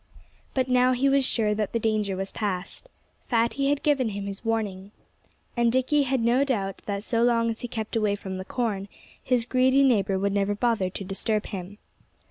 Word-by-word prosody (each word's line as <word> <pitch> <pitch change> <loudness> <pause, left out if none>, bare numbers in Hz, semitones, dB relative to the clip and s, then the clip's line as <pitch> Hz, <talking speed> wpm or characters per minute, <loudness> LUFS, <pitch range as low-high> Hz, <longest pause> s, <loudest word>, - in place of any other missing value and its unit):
But 260 -1 +1
now 255 0 +4
he 255 +2 +1
was 275 0 +3
sure 220 -4 +1
that 210 -1 -2
that 230 - 0
danger 215 -3 0
was 195 +1 -3
past. 200 - -4 0.4
Fatty 235 +4 +1
had 290 0 0
given 275 -6 +2
him 200 -1 -5
his 200 +1 -5
warning. 205 -4 -2 0.7
And 235 -1 +3
Dickie 260 +4 +2
had 265 -2 +1
no 240 +4 +3
doubt 200 -8 -2
that 200 -1 -2
so 230 0 0
long 230 -1 +3
as 225 - -6
he 245 - -5
kept 220 -2 -5
away 210 -2 +2
from 190 -2 -6
the - - -4
corn 210 -5 -2 0.4
his 245 -3 +1
greedy 260 +2 +3
neighbor 200 -7 +2
would 200 +1 0
never 200 0 +1
bother 220 -4 +1
to 195 - -7
disturb 210 +3 -1
him. 195 0 -7
225 Hz, 195 wpm, -26 LUFS, 200-250 Hz, 0.7 s, now